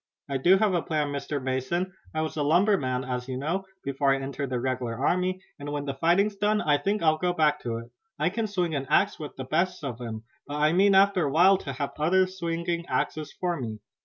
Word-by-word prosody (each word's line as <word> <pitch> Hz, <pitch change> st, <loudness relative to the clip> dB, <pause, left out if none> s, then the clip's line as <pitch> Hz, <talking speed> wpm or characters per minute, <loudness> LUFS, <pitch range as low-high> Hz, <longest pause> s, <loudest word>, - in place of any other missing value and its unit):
"I 140 Hz, -1 st, -1 dB
do 175 Hz, +8 st, +5 dB
have 210 Hz, -1 st, +2 dB
a 175 Hz, -, +2 dB
plan, 150 Hz, -3 st, -1 dB
Mr. 145 Hz, +1 st, -3 dB
Mason. 130 Hz, +8 st, -2 dB, 0.2 s
I 155 Hz, -, -1 dB
was 155 Hz, -, -4 dB
a 155 Hz, -, -1 dB
lumberman, 150 Hz, -5 st, +2 dB
as 125 Hz, -1 st, -4 dB
you 130 Hz, -1 st, -3 dB
know, 170 Hz, +8 st, -2 dB, 0.2 s
before 140 Hz, 0 st, +1 dB
I 135 Hz, -, +3 dB
entered 140 Hz, 0 st, -4 dB
the 125 Hz, -1 st, -1 dB
regular 125 Hz, -2 st, -2 dB
army, 185 Hz, +7 st, 0 dB, 0.2 s
and 145 Hz, 0 st, -5 dB
when 145 Hz, -1 st, -3 dB
the 140 Hz, -, -2 dB
fighting's 175 Hz, +9 st, +2 dB
done 210 Hz, +1 st, +1 dB
I 145 Hz, -7 st, +2 dB
think 205 Hz, 0 st, -1 dB
I'll 155 Hz, -1 st, +3 dB
go 180 Hz, 0 st, +1 dB
back 150 Hz, -3 st, +2 dB
to 115 Hz, -2 st, -3 dB
it. 115 Hz, +1 st, -9 dB, 0.3 s
I -, -, +1 dB
can 225 Hz, +2 st, -1 dB
swing 180 Hz, -5 st, -1 dB
an 135 Hz, -2 st, -2 dB
axe 200 Hz, +1 st, +2 dB
with 150 Hz, -2 st, -7 dB
the 130 Hz, -, -5 dB
best 175 Hz, +5 st, 0 dB
of 125 Hz, -3 st, -5 dB
'em, 110 Hz, -2 st, -6 dB, 0.2 s
but 145 Hz, -, -5 dB
I 150 Hz, +2 st, +3 dB
mean 195 Hz, +2 st, +5 dB
after 195 Hz, -3 st, +4 dB
a 140 Hz, -, -1 dB
while 185 Hz, +5 st, +5 dB
to 140 Hz, -, -5 dB
have 140 Hz, +2 st, -3 dB
others 185 Hz, +4 st, +2 dB
swinging 170 Hz, 0 st, -2 dB
axes 155 Hz, -1 st, -2 dB
for 175 Hz, -5 st, -1 dB
me. 110 Hz, -3 st, -4 dB
155 Hz, 235 wpm, -27 LUFS, 135-185 Hz, 0.3 s, do